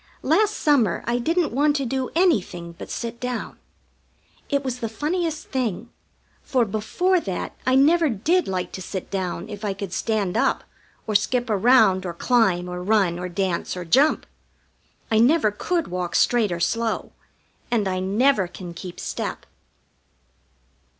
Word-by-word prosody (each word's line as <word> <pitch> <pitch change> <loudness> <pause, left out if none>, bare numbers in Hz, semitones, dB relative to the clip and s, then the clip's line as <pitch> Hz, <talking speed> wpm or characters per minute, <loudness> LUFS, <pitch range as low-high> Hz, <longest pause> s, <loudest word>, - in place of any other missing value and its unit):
Last 425 0 +2
summer 280 -9 +2
I 240 +1 0
didn't 330 +4 0
want 290 +3 +2
to 275 -2 0
do 260 +1 -2
anything 195 - +1
but - - -8
sit 235 0 -5
down. 250 -2 -4 0.9
It 280 -1 0
was 255 -2 -3
the 230 - -3
funniest 315 +6 -2
thing, 240 -3 -2 0.5
for 250 -3 +1
before 225 - +1
that 190 - -4
I 260 - +4
never 315 +4 +4
did 310 - +1
like 185 -1 -3
to 190 - -7
sit 190 0 -6
down 190 -3 -3
if 205 0 -8
I 200 -2 -1
could 195 -2 -6
stand 210 -5 -1
up, - - +1 0.4
or 215 - -2
skip 240 +3 +1
around, 205 -3 +4
or 170 - -5
climb, 190 -5 +2
or 180 0 -5
run, 190 -3 +2
or 180 0 -4
dance, 185 -1 -2
or 180 - -5
jump. 270 - +3 0.9
I 220 - +4
never 245 -2 +4
could 335 - -1
walk 180 -1 -3
straight 230 -5 +3
or 170 - -2
slow, 225 +6 -1 0.6
and 225 -5 +1
I 185 -1 -1
never 205 +2 +2
can 175 -1 -9
keep 175 +1 -8
step. - - -4
220 Hz, 155 wpm, -23 LUFS, 185-270 Hz, 0.9 s, I